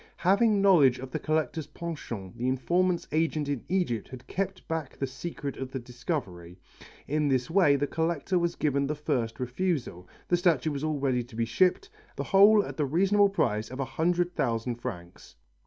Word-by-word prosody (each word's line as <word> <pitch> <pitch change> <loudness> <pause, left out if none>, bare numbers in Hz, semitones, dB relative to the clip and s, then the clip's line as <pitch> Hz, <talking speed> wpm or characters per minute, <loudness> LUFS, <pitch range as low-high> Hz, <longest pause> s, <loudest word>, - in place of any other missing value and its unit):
Having 200 +2 +3
knowledge 150 -11 +6
of 130 0 -8
the - - -2
collector's 155 -1 -1
penchant 150 - -7
the 120 +2 -2
informant's 175 +7 +1
agent 155 -1 0
in 140 -4 -2
Egypt 175 - 0
had 130 -1 -11
kept 195 0 -4
back 160 -4 -4
the 135 - -1
secret 140 +1 -6
of 130 -1 -5
the 135 - -3
discovery. 120 - -5 0.5
In 150 +1 +1
this 130 0 0
way 170 -6 +5
the 140 +1 0
collector 165 +4 -1
was 170 0 -1
given 140 -2 0
the 150 - -2
first 130 -7 -2
refusal, 125 - -2 0.2
the 175 - +3
statue 165 -4 +2
was 140 0 -4
all 155 -1 0
ready 130 -3 +1
to 120 -1 -15
be 115 0 0
shipped, 185 - +1 0.2
the - - -3
whole 205 +1 +6
at - - -8
the 150 - +1
reasonable 195 +7 +3
price 110 - 0
of 130 +2 -8
a 135 - 0
hundred 175 +6 0
thousand 115 +1 -1
francs. 90 -9 -8
145 Hz, 185 wpm, -28 LUFS, 125-175 Hz, 0.5 s, knowledge